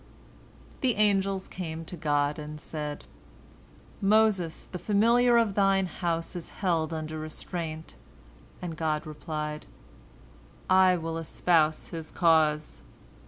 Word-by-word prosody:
The 255 -3 +1
angels 195 -2 +1
came 165 -3 -6
to 180 - -7
God, 145 -2 0
and 150 0 -7
said, 150 -2 -5 1.0
"Moses, 200 -5 +2
the 180 - -7
familiar 235 +5 +4
of 225 -4 +2
Thine 195 -1 +3
house, 170 -1 -3
is 175 - -6
held 165 -4 -1
under 155 -1 -4
restraint," 160 0 -6 0.7
and 170 -2 -4
God 155 -1 -1
replied, 150 0 -5 1.0
"I 185 -1 +5
will 165 0 -4
espouse 160 -1 +1
his 160 -2 -6
cause." 155 -3 +2
165 Hz, 115 wpm, -28 LUFS, 155-190 Hz, 1.0 s, I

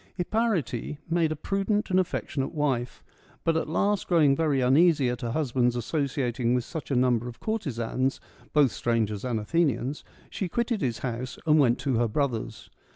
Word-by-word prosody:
Hipparete 175 - -1
made 165 -2 +2
a - - -1
prudent 195 +6 -1
and 185 - +4
affectionate 160 -5 -2
wife; 130 -5 -1 0.2
— - - -30
but 165 - +2
at 160 - -1
last 200 +5 +1
growing 155 -6 +4
very 150 -3 +1
uneasy 140 +1 +4
at 125 - -5
her 120 - -2
husband's 125 -3 +1
associating 125 -2 -1
with 125 - 0
such 155 0 -7
a 135 - 0
number 125 -1 +2
of 120 - -9
courtesans, 135 - -2 0.3
both 145 -5 +4
strangers 110 -3 -1
and 120 -3 -1
Athenians, 140 +1 0 0.3
she 190 - -3
quitted 235 +1 -1
his 120 -4 -1
house 125 +1 -4
and 155 -1 +5
went 125 -4 +4
to 135 -5 0
her 120 0 +2
brother's. 115 -3 -3
135 Hz, 170 wpm, -27 LUFS, 120-165 Hz, 0.3 s, and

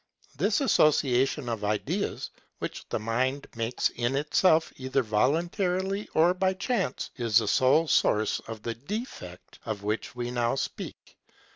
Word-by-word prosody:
This - - +1
association 140 - +3
of 115 -3 -3
ideas, 105 0 -2 0.3
which - - -6
the - - -1
mind 130 +6 -1
makes 115 +1 0
in 120 +2 -1
itself 155 +3 +3
either 130 0 0
voluntarily 180 - 0
or 170 +3 +5
by 190 0 +1
chance, 190 - -2
is 115 -4 +2
the 115 - +3
sole 140 +6 +4
source 110 -6 +2
of 110 -1 -7
the 115 - -2
defect 130 - -7
of 105 -3 -4
which 105 +3 -3
we 120 0 -3
now 120 0 0
speak. - - -6
130 Hz, 140 wpm, -28 LUFS, 115-165 Hz, 0.3 s, or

